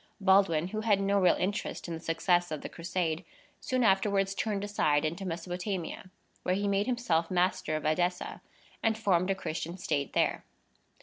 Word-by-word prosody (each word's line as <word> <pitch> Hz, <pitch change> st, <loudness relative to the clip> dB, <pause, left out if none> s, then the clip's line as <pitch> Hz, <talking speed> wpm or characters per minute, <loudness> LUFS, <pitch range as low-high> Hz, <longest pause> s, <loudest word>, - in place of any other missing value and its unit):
Baldwin, 190 Hz, -4 st, +4 dB
who 215 Hz, +2 st, -3 dB
had 215 Hz, -3 st, +3 dB
no 200 Hz, 0 st, +2 dB
real 180 Hz, -2 st, +5 dB
interest 200 Hz, 0 st, -2 dB
in 170 Hz, -, -4 dB
the 165 Hz, -, -4 dB
success 175 Hz, +2 st, +1 dB
of 155 Hz, -2 st, -4 dB
the -, -, -6 dB
Crusade, 170 Hz, -1 st, -2 dB, 0.4 s
soon 255 Hz, -1 st, 0 dB
afterwards 195 Hz, -1 st, +2 dB
turned 205 Hz, -1 st, -2 dB
aside 155 Hz, -7 st, +1 dB
into 170 Hz, +5 st, -3 dB
Mesopotamia, 180 Hz, +2 st, -4 dB, 0.3 s
where 180 Hz, -, 0 dB
he 200 Hz, +1 st, -1 dB
made 200 Hz, +2 st, +1 dB
himself 180 Hz, -10 st, +1 dB
master 180 Hz, -3 st, +1 dB
of 155 Hz, -, -3 dB
Edessa, 175 Hz, +3 st, 0 dB, 0.4 s
and 220 Hz, -1 st, +1 dB
formed 185 Hz, -4 st, +2 dB
a 195 Hz, -, +2 dB
Christian 170 Hz, -1 st, -4 dB
state 145 Hz, -6 st, -2 dB
there. -, -, +1 dB
185 Hz, 170 wpm, -30 LUFS, 165-200 Hz, 0.4 s, real